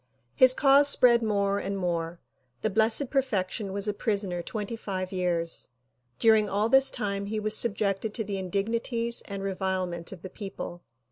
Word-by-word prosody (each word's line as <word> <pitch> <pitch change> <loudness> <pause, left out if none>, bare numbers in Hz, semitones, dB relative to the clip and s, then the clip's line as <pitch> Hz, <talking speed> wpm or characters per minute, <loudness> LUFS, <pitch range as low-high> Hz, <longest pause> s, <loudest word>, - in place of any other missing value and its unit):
His 255 - +6
cause 280 0 +5
spread 240 -4 +4
more 200 -2 0
and 200 0 -3
more. 170 -2 -2 0.4
The 215 - 0
Blessed 220 +6 +2
Perfection 210 -7 -1
was 200 +1 -2
a 210 - 0
prisoner 200 -5 -2
twenty 210 +4 -5
five 185 -4 -5
years. 175 -3 -1 0.5
During 220 -2 +4
all 205 +3 0
this 270 +2 +5
time 200 -5 -3
he 215 +1 -2
was 215 0 +2
sub 220 -2 +2
jected 200 +1 -1
to 225 - -1
the 200 -1 -4
indignities 230 +5 -1
and 200 -1 -6
revilement 185 -3 -3
of 185 -3 -10
the 190 - -6
people. 195 -4 -7
200 Hz, 165 wpm, -27 LUFS, 190-225 Hz, 0.5 s, His